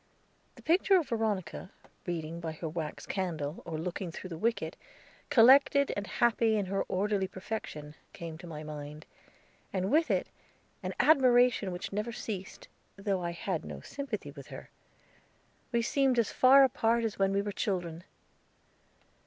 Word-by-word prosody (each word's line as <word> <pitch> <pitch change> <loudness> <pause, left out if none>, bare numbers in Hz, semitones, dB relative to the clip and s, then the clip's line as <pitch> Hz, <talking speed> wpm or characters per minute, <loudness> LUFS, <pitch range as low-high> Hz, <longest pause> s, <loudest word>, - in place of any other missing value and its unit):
The - - -16
picture 375 +3 +4
of 335 - -1
Veronica, 215 -6 -2 0.4
reading 165 -1 -3
by 165 -2 -4
her 160 +1 -5
wax 155 -1 -5
candle, 160 -5 -3
or 160 -2 -3
looking 175 +2 -4
through 185 +2 -8
the 165 - -5
wicket, 230 +3 -1 0.5
collected 280 +2 +6
and 205 0 -4
happy 230 -2 +2
in 205 - 0
her 195 +1 -1
orderly 195 0 0
perfection, 185 -7 -6 0.2
came 165 -1 -7
into 165 +2 -10
my 155 -2 -7
mind, 150 0 -8 0.7
and 190 +1 -1
with 315 +3 +3
it - - +1 0.6
an - - -4
admiration 245 -8 +4
which 180 +3 -5
never 210 +3 -2
ceased, 200 -5 -6 0.3
though 195 -1 -1
I 175 - -2
had 170 0 -3
no - - -8
sympathy 280 -1 -5
with - - -11
her. - - -10 1.0
We 235 -1 +1
seemed 270 +1 +2
as 230 -3 +2
far 270 +2 +7
apart 235 -2 +2
as 220 -3 -3
when 195 0 +3
we 200 0 +1
were 205 - -3
children. 175 -5 -3
195 Hz, 155 wpm, -30 LUFS, 170-235 Hz, 1.0 s, far